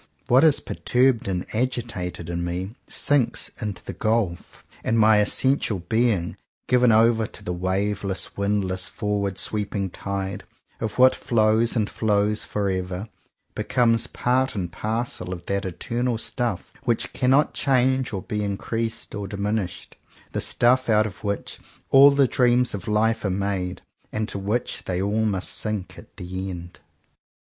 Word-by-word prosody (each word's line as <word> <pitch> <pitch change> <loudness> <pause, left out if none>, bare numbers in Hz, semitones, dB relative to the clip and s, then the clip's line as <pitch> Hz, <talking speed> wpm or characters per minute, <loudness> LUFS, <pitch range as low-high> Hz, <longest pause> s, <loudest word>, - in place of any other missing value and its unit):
What 130 +4 +5
is 155 -3 +6
perturbed 125 -3 +1
and 90 -2 -2
agitated 115 -8 -2
in 85 0 -3
me 90 +4 -3
sinks 140 -5 +1
into 105 -4 -4
the - - -6
gulf; 110 -6 -2 0.2
and 115 - +1
my 110 -1 +6
essential 115 +1 +2
being, 100 -1 0 0.3
given 125 -1 +4
over 110 0 +4
to - - -12
the 90 - -3
waveless, 95 +2 -2
windless, 100 -2 0
forward 100 -3 -2
sweeping 100 -3 -2
tide 100 0 -4 0.4
of 110 -2 -3
what 130 +1 +7
flows 110 +1 +2
and 110 -3 +1
flows 105 -1 0
forever, 95 0 -2 0.4
becomes 115 -1 +2
part 130 +1 0
and 90 -4 -3
parcel 110 0 -3
of 85 -2 -6
that 100 0 -1
eternal 120 +6 -2
stuffs 115 -3 -3
which 120 -2 -1
cannot 130 +4 +3
change 130 -1 +2
or 95 -4 -4
be 105 -1 -3
increased 115 +3 -3
or 100 -1 -4
diminished, 100 -2 -3 0.2
— - - -27
the - - -2
stuff 125 +1 +3
out 110 -1 +4
of 100 -4 -7
which 100 -1 -3 0.3
all 140 +1 +9
the 140 -1 +3
dreams 125 0 +2
of 100 -3 -6
life 110 +1 +1
are 100 - 0
made, 95 -1 -2 0.3
and 110 - -2
into 105 -2 -4
which 105 +5 -2
they 90 -1 -2
all 105 +3 0
must 95 -4 0
sink 105 -4 -3
at - - -17
the 95 +2 -5
end. 85 -1 -8
105 Hz, 150 wpm, -24 LUFS, 95-120 Hz, 0.4 s, all